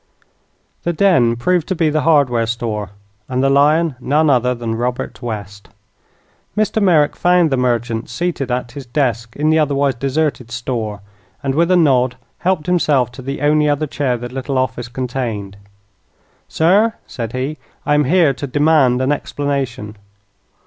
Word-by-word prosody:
The 170 - -1
den 160 -11 +3
proved 170 +7 0
to 190 - -1
be 160 -2 +1
the 155 0 +1
hardware 135 -8 +3
store, 110 -3 -3 0.4
and 130 0 0
the 135 - +3
lion 150 +3 +3
none 145 +4 +2
other 125 -1 +2
than 115 -1 -4
Robert 125 +3 -3
West. 100 -4 -6 0.9
Mr. 215 +1 +1
Merrick 160 -7 +3
found 175 -3 +3
the 135 - +1
merchant 120 -2 -1
seated 150 0 -2
at 125 -1 -2
his 140 -3 -9
desk 120 -4 -1
in 155 +2 +1
the 160 - +3
otherwise 140 -2 +1
deserted 135 0 -2
store, 115 -4 -4 0.4
and, 135 -1 0
with 170 +4 +2
a 185 - +4
nod, 130 -6 +3 0.2
helped 180 -4 0
himself 145 -9 +2
to 130 - -10
the 135 +2 -5
only 150 0 +3
other 145 +1 0
chair 135 -4 -1
the 120 +1 -6
little 135 +1 -3
office 120 -2 -1
contained. 120 -6 -4 0.9
"Sir," 205 +8 +3
said 115 -3 -6
he, 135 +3 -3 0.3
"I 145 - +2
am 150 0 +3
here 160 -1 +3
to 140 +2 -6
demand 140 -3 +3
an 130 - +1
explanation." 135 -7 -3
135 Hz, 160 wpm, -18 LUFS, 120-155 Hz, 0.9 s, a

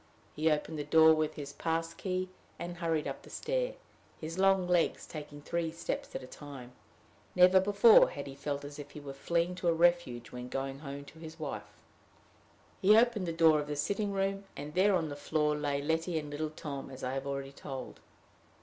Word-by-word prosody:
He 155 +2 +2
opened 150 +1 -1
the - - -1
door 160 +2 +6
with 155 0 0
his 145 -2 -7
pass 165 +2 -2
key, 185 0 -3 0.3
and 175 0 -6
hurried 165 -3 0
up - - -5
the - - -15
stair, - - -2 0.4
his 165 +3 -5
long 195 -1 +4
legs 175 -2 +2
taking 145 -2 -9
three 170 0 -1
steps 165 - -4
at 130 - -4
a - - -7
time. 135 -3 -10 0.6
Never 180 +1 +7
before 205 +4 +7
had 140 - -6
he 135 - -7
felt 140 +1 -4
as 145 +1 -9
if 145 0 -8
he 145 - -9
were 140 -1 -7
fleeing 170 +5 0
to 180 -1 -3
a 170 - +5
refuge 165 -8 +2
when 125 0 -7
going 135 +1 -3
home 140 -1 -7
to 160 - -14
his 160 0 -10
wife. 105 -9 -7 1.0
He 210 +3 +7
opened 230 -5 +3
the - - 0
door 160 -2 +5
of 145 - -4
the 150 - -3
sitting 200 +8 -1
room 195 0 -1
and 145 +1 -6
there 190 +2 +4
on 165 -3 0
the 145 - -5
floor 150 +1 0
lay 145 -1 -1
Letty 160 +2 0
and 150 -1 -4
little 155 +1 -2
Tom, 145 -3 -6
as 130 0 -10
I 125 - -2
have 135 +1 -3
already 140 0 -4
told. 135 -1 -8
155 Hz, 205 wpm, -32 LUFS, 145-175 Hz, 1.0 s, Never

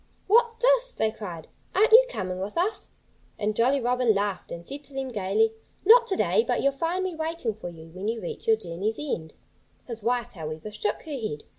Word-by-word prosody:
"What's 460 +2 +4
this?" - - +3
they 220 - 0
cried. 180 -7 -8 0.3
"Aren't 425 +4 +4
you - - +9
coming 185 - -4
with 200 - -5
us?" 380 +6 -1 0.5
And 210 0 -1
Jolly 260 +5 +3
Robin 245 -2 +2
laughed 200 -2 -2
and 170 0 -7
said 285 +1 -7
to 280 - -14
them 265 -1 -3
gaily: 215 0 +1 0.3
"Not 470 +3 +8
to 385 - 0
day! 450 - +3
But - - 0
you'll 275 - +4
find 335 +7 -1
me 375 -1 -2
waiting 320 -7 -2
for 205 -4 -7
you 165 -1 -12
when 185 +4 -5
you 225 +1 -1
reach 175 - -7
your 225 -1 +5
journey's 195 +3 -3
end." 170 - -4 0.5
His 230 -2 -4
wife, 240 +1 0
however, 155 +3 -6
shook 210 0 -2
her 315 - -9
head. 215 - -4
230 Hz, 205 wpm, -26 LUFS, 200-330 Hz, 0.5 s, you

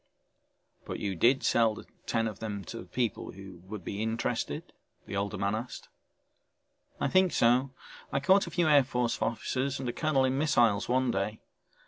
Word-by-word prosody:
"But - - -5
you 100 -2 -2
did 125 +9 +3
sell 115 -2 +3
the - - -10 0.2
ten 115 0 +1
of 105 -3 -6
them 105 -3 -4
to 115 - -7
people 120 -5 -2
who 95 -2 -11
would 100 -1 -7
be 100 - -4
interested?" 110 +1 -2 0.3
the - - -6
older 100 0 -2
man 100 +1 0
asked. 120 +3 -5 1.1
"I - - +1
think 185 +5 +4
so, 125 +3 +3 0.4
I 140 - +1
caught 190 +8 +4
a - - -4
few 170 -2 +1
Air 145 -2 +6
Force 125 -3 -1
officers 130 +5 -1
and 130 - -4
a 120 - -2
colonel 145 -4 +2
in 130 +1 0
missiles 120 -10 +3
one 130 0 +2
day. 105 +2 -2
120 Hz, 175 wpm, -30 LUFS, 105-135 Hz, 1.1 s, Air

